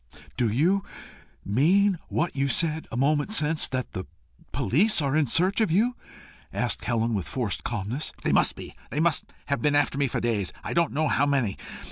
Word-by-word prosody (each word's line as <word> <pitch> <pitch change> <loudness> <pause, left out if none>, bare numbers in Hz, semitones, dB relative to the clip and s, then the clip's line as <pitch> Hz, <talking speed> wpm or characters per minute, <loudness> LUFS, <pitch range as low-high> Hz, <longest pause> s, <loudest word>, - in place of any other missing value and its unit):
"Do 120 -3 +1
you 175 - +2 0.6
mean 175 - +3
what 170 +2 -1
you 140 0 +1
said 160 +2 0
a 115 - -4
moment 145 +8 +1
since 155 -4 +2
that 130 -1 -3
the 95 - -5 0.5
police 180 - +2
are 140 -2 0
in 155 -3 +2
search 185 - +2
of 220 - +2
you?" 225 +9 +2 0.6
asked - - -1
Helen, 115 -1 0
with 95 -5 -2
forced 115 -7 -3
calmness. 115 +5 -3
"They - - +1
must - - +4
be. - - -9 0.2
They 145 - -3
must 165 -1 +2 0.2
have 140 - -1
been 150 -1 +2
after 145 -1 +1
me 140 - +2
for - - -2
days 105 -6 -1
I - - -4
don't 170 -2 +2
know 155 +2 0
how 145 0 +2
many. 130 -9 +1
145 Hz, 190 wpm, -26 LUFS, 120-165 Hz, 0.6 s, must